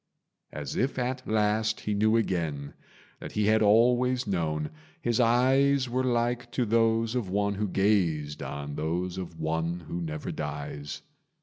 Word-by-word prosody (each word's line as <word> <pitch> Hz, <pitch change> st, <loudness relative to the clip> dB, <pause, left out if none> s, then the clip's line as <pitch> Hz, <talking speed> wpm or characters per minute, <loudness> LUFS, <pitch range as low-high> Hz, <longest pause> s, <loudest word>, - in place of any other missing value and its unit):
As -, -, -5 dB
if 130 Hz, +2 st, 0 dB
at 125 Hz, 0 st, -2 dB
last 110 Hz, 0 st, +1 dB
he 105 Hz, -, -2 dB
knew 110 Hz, +2 st, +3 dB
again 80 Hz, -9 st, -2 dB, 0.5 s
That -, -, -8 dB
he 105 Hz, -, +1 dB
had 110 Hz, +1 st, +4 dB
always 125 Hz, +4 st, +4 dB
known, 80 Hz, -6 st, -1 dB, 0.3 s
his 120 Hz, 0 st, 0 dB
eyes 130 Hz, +3 st, +4 dB
Were 130 Hz, +2 st, 0 dB
like 120 Hz, 0 st, 0 dB
to 125 Hz, -, +1 dB
those 115 Hz, 0 st, +2 dB
of 120 Hz, -7 st, -2 dB
one 100 Hz, +1 st, +1 dB
who 105 Hz, +1 st, -1 dB
gazed 90 Hz, -7 st, +1 dB
On 70 Hz, 0 st, -5 dB
those 85 Hz, +5 st, -2 dB
of 85 Hz, -3 st, -7 dB
One 80 Hz, +2 st, -1 dB
who 85 Hz, +2 st, -5 dB
never 80 Hz, -2 st, -4 dB
dies. 70 Hz, 0 st, -5 dB
105 Hz, 150 wpm, -28 LUFS, 85-120 Hz, 0.5 s, had